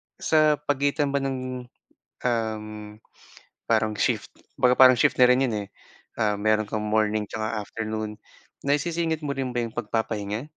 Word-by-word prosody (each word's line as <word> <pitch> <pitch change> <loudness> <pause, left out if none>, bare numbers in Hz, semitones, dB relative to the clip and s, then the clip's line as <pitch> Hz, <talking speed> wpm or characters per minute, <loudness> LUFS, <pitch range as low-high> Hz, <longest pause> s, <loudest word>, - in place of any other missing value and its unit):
sa 155 -1 +3
pagitan 145 0 0
ba 140 - +1
ng 130 -2 -4 0.6
uhm, 110 -3 -3 0.7
parang 110 -2 +1
shift - - 0 0.3
kumbaga 125 0 +4
parang 130 -1 +9
shift - - +3
na 125 - +6
rin 125 +1 +5
'yon, 120 -5 0
eh. - - -16 0.5
Ah, 105 -1 +2
meron 110 0 +1
kang 105 -1 -3
morning 105 0 +1
tsaka 110 +2 -4
afternoon, 110 -1 -5 0.4
naisisingit 160 +2 -1
mo 140 - -1
rin 130 -2 -3
ba 120 - +1
'yong 115 - -6
pagpapahinga? 110 -1 -2
115 Hz, 150 wpm, -25 LUFS, 110-135 Hz, 0.7 s, parang